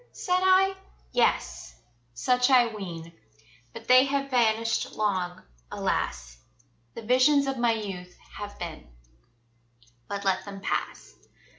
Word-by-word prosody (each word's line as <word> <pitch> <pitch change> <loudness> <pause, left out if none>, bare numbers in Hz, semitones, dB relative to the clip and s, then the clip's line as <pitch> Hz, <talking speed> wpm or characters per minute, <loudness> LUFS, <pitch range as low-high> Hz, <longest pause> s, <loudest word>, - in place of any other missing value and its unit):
said 360 -1 0
I? 375 +1 +4 0.4
Yes! - - 0 0.4
such 250 - +2
I 245 -4 +4
ween 170 -5 -8 0.6
But - - -11
they 255 +1 +7
have 275 0 -2
vanished 230 -2 +1
long, 185 -4 -2 0.3
alas! - - -3 0.6
The 230 - -7
visions 260 +5 +4
of 270 -2 -3
my 240 -1 +3
youth 185 -5 -7 0.2
have 205 0 -7
been 165 - -7 1.2
But 200 0 -5
let 190 -1 +1
them 200 0 -9
pass. - - -4
220 Hz, 120 wpm, -27 LUFS, 185-255 Hz, 1.2 s, they